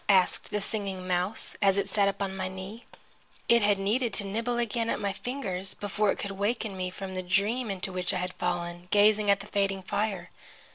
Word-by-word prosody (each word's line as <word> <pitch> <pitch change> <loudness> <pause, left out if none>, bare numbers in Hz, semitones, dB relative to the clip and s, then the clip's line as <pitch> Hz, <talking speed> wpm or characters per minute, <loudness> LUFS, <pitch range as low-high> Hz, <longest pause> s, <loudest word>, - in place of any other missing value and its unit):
asked 190 -2 +4
the 210 - -1
Singing 195 -3 -3
Mouse, 180 +4 0
as 195 -1 +4
it 200 - +1
sat 200 -2 +2
upon 195 -1 -1
my 185 -1 -2
knee. 190 +5 -8 0.6
It 235 0 +6
had 205 -1 +4
needed 225 +5 +1
to - - +1
nibble 230 +5 -1
again 235 -1 0
at - - 0
my 200 -2 -1
fingers 195 -6 -4
before 205 +1 0
it - - -3
could 200 - -4
waken 205 +1 -1
me 185 -1 -2
from 190 +1 -6
the 185 - -2
dream 205 +6 +1
into 190 -1 -3
which 180 -1 0
I - - -1
had 180 0 -3
fallen, 175 0 -3
gazing 210 +1 +5
at 200 0 +4
the - - -9
fading 195 -2 0
fire. 205 +1 -2
200 Hz, 205 wpm, -29 LUFS, 185-215 Hz, 0.6 s, It